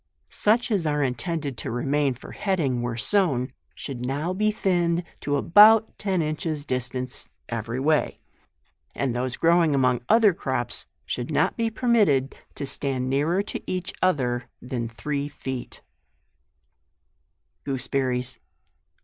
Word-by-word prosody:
Such 230 Hz, +3 st, +2 dB
as 185 Hz, -7 st, +1 dB
are 150 Hz, -1 st, +1 dB
intended 135 Hz, +2 st, -2 dB
to -, -, -4 dB
remain 135 Hz, +3 st, 0 dB
for 125 Hz, -, -11 dB
heading 155 Hz, -11 st, 0 dB
where 120 Hz, -1 st, -3 dB
sown, 130 Hz, -, +1 dB, 0.2 s
should 130 Hz, -4 st, -6 dB
now 145 Hz, +8 st, -1 dB
be 215 Hz, +3 st, +1 dB
thinned 175 Hz, -5 st, +1 dB, 0.2 s
to 145 Hz, -, -1 dB
about 215 Hz, +7 st, +6 dB
ten 190 Hz, -5 st, 0 dB
inches 155 Hz, -1 st, -3 dB
distance 125 Hz, -1 st, -1 dB, 0.2 s
every 115 Hz, +2 st, -3 dB
way; 150 Hz, +2 st, +1 dB, 0.8 s
and 130 Hz, -4 st, -1 dB
those 125 Hz, +1 st, -2 dB
growing 165 Hz, -3 st, +4 dB
among 125 Hz, -2 st, +2 dB
other 220 Hz, -4 st, +6 dB
crops 130 Hz, -6 st, -2 dB, 0.2 s
should -, -, -3 dB
not -, -, +1 dB
be 230 Hz, -1 st, 0 dB
permitted 215 Hz, -, +2 dB, 0.2 s
to 140 Hz, -, -4 dB
stand 130 Hz, -2 st, -2 dB
nearer 160 Hz, +8 st, +1 dB
to -, -, -5 dB
each 185 Hz, -1 st, -3 dB
other 125 Hz, -9 st, +1 dB
than 125 Hz, -2 st, -4 dB
three 140 Hz, +5 st, -3 dB
feet, 130 Hz, -3 st, -7 dB, 1.8 s
GOOSEBERRIES. 130 Hz, -2 st, -1 dB
140 Hz, 130 wpm, -25 LUFS, 125-175 Hz, 1.8 s, about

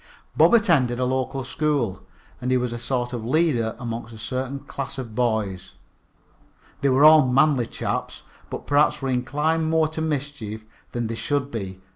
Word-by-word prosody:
Bob 235 Hz, -, +6 dB
attended 155 Hz, -, +3 dB
the 125 Hz, -, 0 dB
local 130 Hz, +1 st, -1 dB
school, 135 Hz, -8 st, -1 dB, 0.4 s
and 125 Hz, -, -2 dB
he 130 Hz, -, +3 dB
was 125 Hz, -1 st, -2 dB
a 120 Hz, -, -5 dB
sort 120 Hz, 0 st, -2 dB
of 120 Hz, -3 st, -4 dB
leader 125 Hz, -4 st, +1 dB
among 115 Hz, -2 st, -5 dB
a 115 Hz, -2 st, -12 dB
certain 130 Hz, +4 st, -3 dB
class 135 Hz, 0 st, -6 dB
of 120 Hz, -4 st, -6 dB
boys. 110 Hz, -6 st, -1 dB, 1.1 s
They 140 Hz, -, +3 dB
were 135 Hz, +3 st, +5 dB
all 155 Hz, -3 st, +8 dB
manly 135 Hz, -1 st, +3 dB
chaps, -, -, -4 dB, 0.3 s
but -, -, -6 dB
perhaps 145 Hz, -1 st, +2 dB
were 135 Hz, -, -1 dB
inclined 150 Hz, +6 st, 0 dB
more 160 Hz, -1 st, +3 dB
to 160 Hz, 0 st, -5 dB
mischief 140 Hz, -8 st, -4 dB, 0.3 s
than 120 Hz, -1 st, -2 dB
they 115 Hz, -, -3 dB
should 140 Hz, +5 st, -2 dB
be. 95 Hz, -4 st, -5 dB
130 Hz, 170 wpm, -24 LUFS, 115-145 Hz, 1.1 s, all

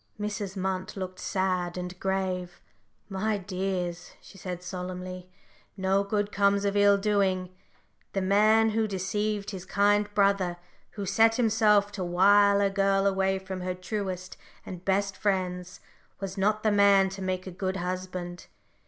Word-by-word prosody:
Mrs. 205 Hz, -2 st, -4 dB
Munt 190 Hz, 0 st, -3 dB
looked 185 Hz, -1 st, -6 dB
sad 185 Hz, -2 st, -1 dB
and 180 Hz, 0 st, -6 dB
grave. 185 Hz, -2 st, -2 dB, 0.5 s
"My 210 Hz, +2 st, -1 dB
dears," 185 Hz, -2 st, -4 dB
she -, -, -16 dB
said, 180 Hz, -1 st, -6 dB
solemnly, 180 Hz, 0 st, -6 dB, 0.5 s
"no 190 Hz, +1 st, +2 dB
good 205 Hz, 0 st, -1 dB
comes 200 Hz, 0 st, +2 dB
of 200 Hz, 0 st, 0 dB
ill 205 Hz, 0 st, +5 dB
doing. 195 Hz, -3 st, 0 dB, 0.6 s
The 195 Hz, -, 0 dB
man 215 Hz, +3 st, +4 dB
who 220 Hz, 0 st, +1 dB
deceived 205 Hz, +2 st, -2 dB
his 190 Hz, -3 st, -7 dB
kind 205 Hz, +2 st, +2 dB
brother, 195 Hz, -3 st, +2 dB, 0.4 s
who 200 Hz, -, -3 dB
set 225 Hz, +4 st, +4 dB
himself 215 Hz, -3 st, +3 dB
to 195 Hz, -2 st, -4 dB
wile 200 Hz, +3 st, +5 dB
a 200 Hz, -1 st, +2 dB
girl 195 Hz, 0 st, +2 dB
away 190 Hz, -1 st, +2 dB
from 190 Hz, -1 st, -6 dB
her 180 Hz, 0 st, -3 dB
truest 185 Hz, -1 st, -5 dB, 0.3 s
and 180 Hz, -1 st, -8 dB
best 195 Hz, +1 st, 0 dB
friends, 185 Hz, -3 st, -2 dB, 0.4 s
was 195 Hz, -1 st, -5 dB
not 210 Hz, +2 st, +1 dB
the 215 Hz, -, +3 dB
man 200 Hz, -1 st, +5 dB
to 195 Hz, +1 st, -8 dB
make 185 Hz, -1 st, -2 dB
a 185 Hz, -, -6 dB
good 185 Hz, +1 st, -3 dB
husband. 180 Hz, -1 st, -5 dB
195 Hz, 150 wpm, -27 LUFS, 185-205 Hz, 0.6 s, ill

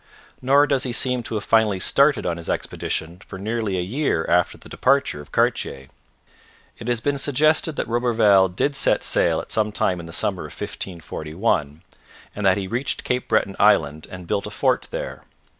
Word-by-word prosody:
Nor 140 Hz, +3 st, +4 dB
does 140 Hz, -3 st, +1 dB
he 125 Hz, -2 st, -3 dB
seem 125 Hz, 0 st, +1 dB
to 115 Hz, -, -5 dB
have 105 Hz, -, -2 dB
finally 110 Hz, -4 st, +2 dB
started 140 Hz, +7 st, +3 dB
on 85 Hz, -1 st, -1 dB
his 85 Hz, -, -8 dB
expedition 85 Hz, +3 st, -3 dB
for 95 Hz, -, -10 dB
nearly 105 Hz, -1 st, -2 dB
a -, -, 0 dB
year 105 Hz, -, -1 dB
after 90 Hz, 0 st, +2 dB
the -, -, -15 dB
departure 135 Hz, -, +1 dB
of 75 Hz, -, -15 dB
Cartier. 65 Hz, 0 st, -1 dB, 0.9 s
It 115 Hz, -, -8 dB
has 120 Hz, -2 st, +1 dB
been 145 Hz, +1 st, -1 dB
suggested 155 Hz, +3 st, +2 dB
that -, -, -3 dB
Roberval 115 Hz, -5 st, +3 dB
did 140 Hz, +11 st, -1 dB
set -, -, +2 dB
sail -, -, +2 dB
at -, -, -12 dB
some 105 Hz, -1 st, +1 dB
time 90 Hz, -3 st, 0 dB
in 85 Hz, -, -8 dB
the -, -, -9 dB
summer 90 Hz, +2 st, 0 dB
of -, -, -13 dB
1541, 80 Hz, -2 st, -3 dB, 0.5 s
and 105 Hz, -, -3 dB
that 95 Hz, -, +4 dB
he 95 Hz, -2 st, -3 dB
reached 120 Hz, +6 st, -2 dB
Cape 125 Hz, 0 st, -2 dB
Breton 100 Hz, -3 st, +1 dB
island 80 Hz, -7 st, +3 dB
and 90 Hz, -1 st, -9 dB
built -, -, -2 dB
a -, -, -5 dB
fort -, -, 0 dB
there. -, -, -6 dB
105 Hz, 190 wpm, -22 LUFS, 90-125 Hz, 0.9 s, Nor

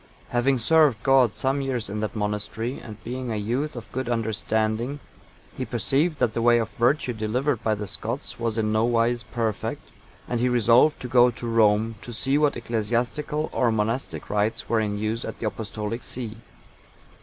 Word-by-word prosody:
Having 130 Hz, +2 st, +2 dB
served 140 Hz, -2 st, +4 dB
God 130 Hz, -5 st, +5 dB
some 135 Hz, +6 st, 0 dB
years 130 Hz, -4 st, -2 dB
in 105 Hz, +2 st, -4 dB
that 110 Hz, +1 st, -3 dB
monastery, 105 Hz, +3 st, -2 dB
and 110 Hz, -3 st, -9 dB
being 125 Hz, +1 st, -4 dB
a -, -, -1 dB
youth 125 Hz, +9 st, -2 dB
of 120 Hz, -, -7 dB
a -, -, -26 dB
good 130 Hz, -1 st, -2 dB
understanding, 110 Hz, -, -1 dB, 0.6 s
he -, -, -3 dB
perceived 155 Hz, +3 st, 0 dB
that 120 Hz, -4 st, +1 dB
the 115 Hz, -, -1 dB
way 120 Hz, 0 st, +5 dB
of 115 Hz, -2 st, -1 dB
virtue 130 Hz, 0 st, +1 dB
delivered 120 Hz, +4 st, -1 dB
by 110 Hz, -1 st, +2 dB
the 105 Hz, 0 st, -5 dB
Scots 100 Hz, -, -5 dB
was 115 Hz, -1 st, -1 dB
in 110 Hz, -1 st, +1 dB
no 110 Hz, +1 st, +2 dB
wise 120 Hz, 0 st, +2 dB
perfect, 115 Hz, -4 st, -3 dB, 0.4 s
and 120 Hz, -, -1 dB
he 125 Hz, +1 st, +2 dB
resolved 120 Hz, +5 st, +4 dB
to 125 Hz, -, -4 dB
go 125 Hz, 0 st, +6 dB
to 120 Hz, 0 st, -7 dB
Rome, 110 Hz, -1 st, +3 dB
to 120 Hz, -, -8 dB
see 135 Hz, +5 st, +1 dB
what 150 Hz, -3 st, +2 dB
ecclesiastical 120 Hz, +7 st, -1 dB
or 120 Hz, -3 st, +2 dB
monastic 110 Hz, +4 st, -2 dB
rites 105 Hz, +2 st, 0 dB
were 115 Hz, -, +2 dB
in 105 Hz, -1 st, -1 dB
use 110 Hz, +3 st, -2 dB
at -, -, -6 dB
the -, -, -5 dB
Apostolic 110 Hz, +1 st, -4 dB
see. 115 Hz, -3 st, -5 dB
115 Hz, 185 wpm, -25 LUFS, 110-125 Hz, 0.6 s, go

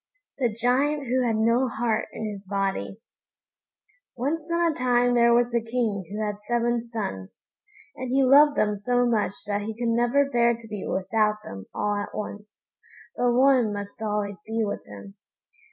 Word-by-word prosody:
THE 245 Hz, -4 st, +1 dB
GIANT 265 Hz, +6 st, +1 dB
WHO 255 Hz, +1 st, +1 dB
HAD 225 Hz, -, +1 dB
NO 230 Hz, +4 st, +2 dB
HEART 225 Hz, -2 st, 0 dB
IN 215 Hz, -1 st, -4 dB
HIS 200 Hz, -1 st, -10 dB
BODY 195 Hz, +1 st, -2 dB, 1.2 s
Once 305 Hz, +6 st, -2 dB
on 340 Hz, 0 st, +2 dB
a -, -, -7 dB
time 245 Hz, -1 st, +2 dB
there 235 Hz, -1 st, +5 dB
was 240 Hz, 0 st, +3 dB
a 235 Hz, -, +2 dB
King 225 Hz, -4 st, -2 dB
who 215 Hz, +1 st, -3 dB
had 210 Hz, 0 st, -4 dB
seven 240 Hz, 0 st, +1 dB
sons, 205 Hz, -, -5 dB, 0.7 s
and 255 Hz, -1 st, -5 dB
he 270 Hz, +2 st, +3 dB
loved 285 Hz, +3 st, +6 dB
them 210 Hz, -1 st, +2 dB
so 245 Hz, +4 st, +1 dB
much 220 Hz, -5 st, +1 dB
that 205 Hz, -1 st, -1 dB
he 215 Hz, +1 st, -5 dB
could 240 Hz, -1 st, -1 dB
never 240 Hz, +4 st, +2 dB
bear 235 Hz, -3 st, +2 dB
to 230 Hz, 0 st, -13 dB
be 210 Hz, -3 st, -6 dB
without 210 Hz, +2 st, 0 dB
them 95 Hz, -1 st, -9 dB
all 205 Hz, 0 st, -1 dB
at 205 Hz, -, -5 dB
once, 210 Hz, 0 st, -8 dB, 0.4 s
but 245 Hz, 0 st, +2 dB
one 255 Hz, -3 st, +4 dB
must 205 Hz, +2 st, -7 dB
always 210 Hz, -2 st, -2 dB
be 225 Hz, +1 st, -2 dB
with 205 Hz, -, -4 dB
him. 100 Hz, -1 st, -11 dB
230 Hz, 175 wpm, -25 LUFS, 210-245 Hz, 1.2 s, loved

